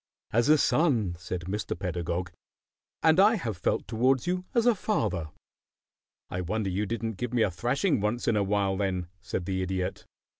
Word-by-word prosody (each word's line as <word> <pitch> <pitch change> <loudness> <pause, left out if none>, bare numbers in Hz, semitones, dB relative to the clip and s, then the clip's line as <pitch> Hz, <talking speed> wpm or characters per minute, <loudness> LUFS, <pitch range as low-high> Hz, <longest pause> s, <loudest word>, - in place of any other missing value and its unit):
"As 120 +5 +3
a 155 - +7
son," 125 - +2
said 90 +1 -4
Mr. 100 +5 -3
Pedagog. 85 -1 -3 0.7
"And 160 +2 +5
I 210 +4 +6
have 115 - -3
felt 85 - -1
towards 125 +3 +2
you 180 +1 -1
as 235 -1 +3
a 240 - +6
father." 105 - -1 1.0
"I 90 - -3
wonder 100 +2 -1
you 100 +3 -1
didn't 115 -1 -3
give 125 +3 -3
me 115 - +4
a 100 - +1
thrashing 125 - 0
once 110 +4 -1
in - - +3
a 105 - +2
while, 100 -1 +1
then," 95 -3 -1
said 95 -3 -3
the 95 0 -1
Idiot. 95 0 -3
105 Hz, 180 wpm, -28 LUFS, 95-125 Hz, 1.0 s, a